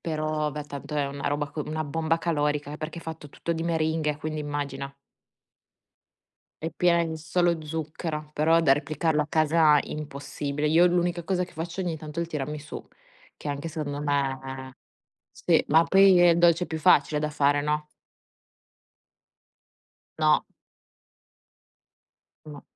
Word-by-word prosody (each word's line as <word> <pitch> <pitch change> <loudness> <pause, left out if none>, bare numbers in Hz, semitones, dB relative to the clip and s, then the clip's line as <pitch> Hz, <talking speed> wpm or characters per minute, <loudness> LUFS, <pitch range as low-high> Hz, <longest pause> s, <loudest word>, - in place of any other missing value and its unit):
Però 155 -1 -2
beh, 150 0 -6
tanto 145 +1 -7
è 145 -1 +1
una 140 +1 -3
roba 145 0 -2
co 155 - -5
una 155 +1 -3
bomba 160 +2 0
calorica 150 -3 -1
perché 160 +2 -6
è - - -14
fatto 160 -2 -8
tutto 170 - -4
di 165 0 -3
meringhe, 160 -2 0
quindi 155 0 -4
immagina. 140 -2 -4 1.7
È 165 - -2
piena 175 -1 +3
in 160 -1 -3
solo 165 +1 0
zucchero, 155 0 -5
però 160 +2 +3
da 145 -5 +5
replicarlo 150 +2 0
a - - -7
casa, 155 -1 +4
impossibile. 145 0 -4
Io 165 +4 +5
l'unica 175 -1 +1
cosa 180 +1 0
che - - -17
faccio 165 +3 -5
ogni 175 -3 -2
tanto 155 0 -8
è 170 - +2
il - - -4
tiramisù, 150 0 -5 0.5
che - - -11
anche 145 +2 -3
se 160 0 -6
non 145 0 -4
è 135 -1 -2 0.6
sì, - - +2
ma 160 +2 +5
poi 195 +1 +6
è 175 - +7
il 170 0 +4
dolce 175 0 +4
più 160 - -4
facile 155 -2 +4
da 150 0 -1
fare, 145 -1 +2
no? 150 +1 -1 2.3
No. - - +4 2.0
No. 150 -2 -10
155 Hz, 150 wpm, -26 LUFS, 145-165 Hz, 2.3 s, è